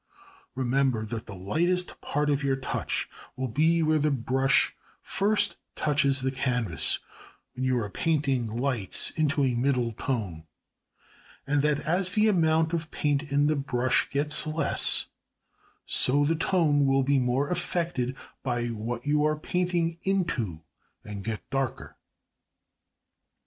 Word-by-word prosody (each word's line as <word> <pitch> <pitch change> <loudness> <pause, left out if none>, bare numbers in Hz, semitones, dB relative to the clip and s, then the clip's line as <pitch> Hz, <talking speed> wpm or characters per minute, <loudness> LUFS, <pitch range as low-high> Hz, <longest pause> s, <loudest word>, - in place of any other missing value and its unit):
Remember 130 -3 0
that 110 0 -6
the 100 - -8
lightest 175 - -1
part 150 0 0
of 140 0 0
your 135 -1 +1
touch 135 -1 -3 0.3
will 130 0 -3
be 160 +7 +2
where 155 0 +2
the 150 +1 +2
brush 135 +1 +1 0.3
first 210 +2 0 0.2
touches 140 -2 +2
the 130 0 0
canvas 125 - 0 0.6
when 130 +1 -3
you 130 -1 +1
are 110 -3 -1
painting 135 -1 0
lights 115 -2 +1
into 150 -2 0
a 130 -2 +2
middle 125 -1 0
tone; 100 - -4 1.0
and 145 0 +1
that 150 0 +1
as 180 +3 +1
the 215 +2 +2
amount 160 -4 +2
of 165 -1 -2
paint 145 0 -1
in 145 +1 +3
the 155 +1 +2
brush 130 -3 0
gets 150 +2 +1
less, 155 +1 +3 0.8
so 145 +3 +4
the 165 +3 +1
tone 155 -4 +2
will 135 0 +3
be 140 +1 +2
more 130 +4 0
affected 170 -7 -2 0.3
by 120 -2 -2
what 115 +2 -5
you 150 0 +2
are 155 0 +1
painting 170 0 -1
into, 130 - -1 0.4
and 100 -1 -7
get 110 0 -5
darker. 135 -3 -3
140 Hz, 140 wpm, -27 LUFS, 125-155 Hz, 1.0 s, so